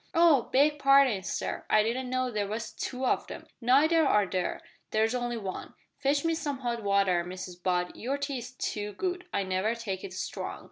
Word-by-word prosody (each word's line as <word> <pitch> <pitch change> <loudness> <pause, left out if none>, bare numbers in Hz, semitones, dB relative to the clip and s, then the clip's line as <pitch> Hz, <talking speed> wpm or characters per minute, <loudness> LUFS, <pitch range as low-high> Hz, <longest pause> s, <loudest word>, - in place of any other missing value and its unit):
"Oh! 325 -7 +5
beg 295 +2 +3
parding, 275 -7 +5
sir, 190 - -3
I 215 - +5
didn't 250 +3 -2
know 255 0 0
there 210 -2 -1
was 215 +2 -4
two 260 0 -4
of - - 0
'em." - - -8 0.2
"Neither 300 +7 +4
are 210 -8 +4
there. 185 -1 -2 0.3
There's 220 +2 +1
only 240 -1 -2
one. 195 -4 -6 0.2
Fetch 285 +2 +1
me 330 - +2
some 290 -4 -3
hot 235 -2 -2
water, 200 -4 +2
Mrs 180 0 -8
Butt, 180 -1 0
your 265 +4 -2
tea 280 -2 -3
is 245 +1 -7
too 210 -4 -3
good. 360 - -3
I 200 - 0
never 190 +4 0
take 200 -5 -5
it 185 - -7
strong." 185 - -5
235 Hz, 195 wpm, -29 LUFS, 200-275 Hz, 0.3 s, Oh